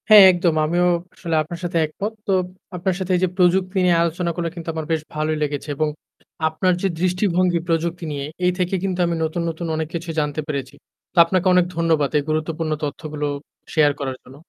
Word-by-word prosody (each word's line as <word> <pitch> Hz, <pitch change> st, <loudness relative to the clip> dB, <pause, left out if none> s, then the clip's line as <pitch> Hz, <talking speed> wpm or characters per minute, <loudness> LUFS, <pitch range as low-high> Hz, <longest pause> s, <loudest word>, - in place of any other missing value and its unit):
হ্যাঁ, 210 Hz, -2 st, +11 dB
একদম। 175 Hz, -2 st, +1 dB
আমিও 175 Hz, +3 st, +2 dB, 0.3 s
আসলে 165 Hz, -3 st, -2 dB
আপনার 170 Hz, +2 st, -6 dB
সাথে 175 Hz, -1 st, -1 dB
একমত। 200 Hz, +8 st, -4 dB
তো -, -, +1 dB, 0.4 s
আপনার 180 Hz, +1 st, -1 dB
সাথে 190 Hz, 0 st, -2 dB
এই 180 Hz, -, +1 dB
যে -, -, +4 dB
প্রযুক্তি 185 Hz, +1 st, +3 dB
নিয়ে 175 Hz, -1 st, +4 dB
আলোচনাগুলা 170 Hz, 0 st, -1 dB
কিন্তু 170 Hz, -1 st, -6 dB
আমার 160 Hz, -1 st, -4 dB
বেশ 160 Hz, -1 st, +1 dB
ভালোই 155 Hz, 0 st, -1 dB
লেগেছে 145 Hz, 0 st, -3 dB
এবং 155 Hz, +2 st, +1 dB, 0.6 s
আপনার 180 Hz, +4 st, +1 dB
যে 195 Hz, -, +2 dB
দৃষ্টিভঙ্গি 180 Hz, -1 st, +2 dB
প্রযুক্তি 170 Hz, +1 st, -1 dB
নিয়ে 140 Hz, -1 st, -3 dB, 0.2 s
এই 180 Hz, -, +4 dB
থেকে 180 Hz, +1 st, +1 dB
কিন্তু 185 Hz, -2 st, -1 dB
আমি 170 Hz, 0 st, 0 dB
নতুন, 160 Hz, +2 st, -1 dB
নতুন 165 Hz, +1 st, -4 dB
অনেক 160 Hz, 0 st, -2 dB
কিছু 170 Hz, +1 st, -4 dB
জানতে 150 Hz, 0 st, -1 dB
পেরেছি। 140 Hz, -2 st, -4 dB, 0.4 s
তো -, -, -21 dB
আপনাকে 185 Hz, +2 st, +1 dB
অনেক 180 Hz, -1 st, +5 dB
ধন্যবাদ 160 Hz, -4 st, +2 dB
এই 145 Hz, -, +1 dB
গুরুত্বপূর্ণ 155 Hz, +1 st, -1 dB
তথ্যগুলো 150 Hz, 0 st, -4 dB, 0.5 s
শেয়ার 150 Hz, -2 st, +5 dB
করার 135 Hz, -2 st, -3 dB
জন্য। 130 Hz, -, -14 dB
170 Hz, 190 wpm, -21 LUFS, 155-180 Hz, 0.6 s, হ্যাঁ